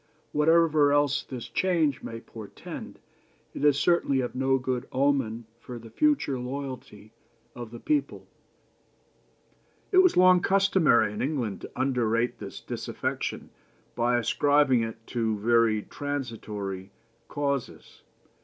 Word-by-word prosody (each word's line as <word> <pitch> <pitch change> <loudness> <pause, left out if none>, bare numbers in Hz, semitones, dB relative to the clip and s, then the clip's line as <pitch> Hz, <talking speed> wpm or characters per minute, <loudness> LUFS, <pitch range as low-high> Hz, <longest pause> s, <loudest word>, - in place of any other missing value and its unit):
Whatever 155 -1 +4
else 145 -1 +2
this 125 -3 -8
change 165 -7 +1
may 115 - -7
portend, 110 -3 -9 0.6
it - - -6
is 145 -2 +4
certainly 155 -5 +2
of 125 -1 -2
no 135 +1 +1
good 130 -1 -3
omen 130 -4 0
for 125 0 -8
the 115 -1 -12
future 285 - +1
loyalty 125 -5 -7 0.4
of 120 -2 -8
the 120 +1 -10
people. 300 -2 -1 1.7
"It 370 - +5
was 370 -2 +5
long 185 0 +6
customary 190 - +3
in 105 - -5
England 125 -9 -2
to - - -9
underrate 120 -3 0
this - - -8
disaffection - - -4 0.4
by 120 +1 +1
ascribing 145 +1 +3
it 115 0 -6
to 110 -3 -1
very 110 0 +2
transitory 110 -9 -5 0.4
causes. 140 - -4
130 Hz, 120 wpm, -27 LUFS, 115-145 Hz, 1.7 s, long